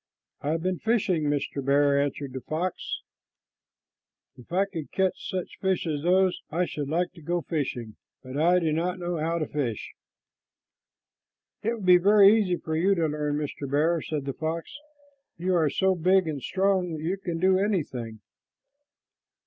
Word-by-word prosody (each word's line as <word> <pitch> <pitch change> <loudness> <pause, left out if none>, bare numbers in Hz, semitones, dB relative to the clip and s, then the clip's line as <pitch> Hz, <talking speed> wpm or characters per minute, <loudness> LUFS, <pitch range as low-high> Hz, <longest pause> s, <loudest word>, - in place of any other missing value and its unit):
"I 145 - -2
have 165 +1 -1
been 185 -1 -1
fishing, 205 -8 +1
Mr. 145 -1 -1
Bear," 140 +1 +3
answered 140 -1 -3
the 130 - -5
fox. 170 +6 -3 1.3
"If 125 - -16
I 190 +3 +2
could 170 -7 -7
catch 190 -1 -1
such 185 -2 -5
fish 190 -2 0
as 150 -3 -2
those, 185 +2 +2
I 175 +3 0
should 145 -4 -5
like 175 +3 0
to 170 - -14
go 175 +3 -1
fishing, 130 -9 -4 0.3
but 130 0 -8
I 170 +5 +4
do 165 -3 +1
not 175 +4 -1
know 175 -1 -3
how 165 +2 -1
to 155 - -1
fish." 125 -8 -3 1.7
"It 225 +2 0
would 210 -5 -7
be 180 -1 +8
very 200 +2 +7
easy 190 -5 +1
for 160 -1 -4
you 190 +5 +3
to 165 -3 +1
learn, 150 -1 -1
Mr. 145 -2 -4
Bear," 160 +4 +2
said 150 -3 -4
the 135 - -3
fox. 165 - -4 0.6
"You 185 +2 0
are 160 -4 +3
so 190 +6 +2
big 185 +1 +3
and 145 -3 -3
strong 190 +1 +1
that 155 -1 -5
you 180 +4 -1
can 175 -4 -4
do 185 +1 +4
anything." 130 - -2
165 Hz, 175 wpm, -26 LUFS, 145-185 Hz, 1.7 s, be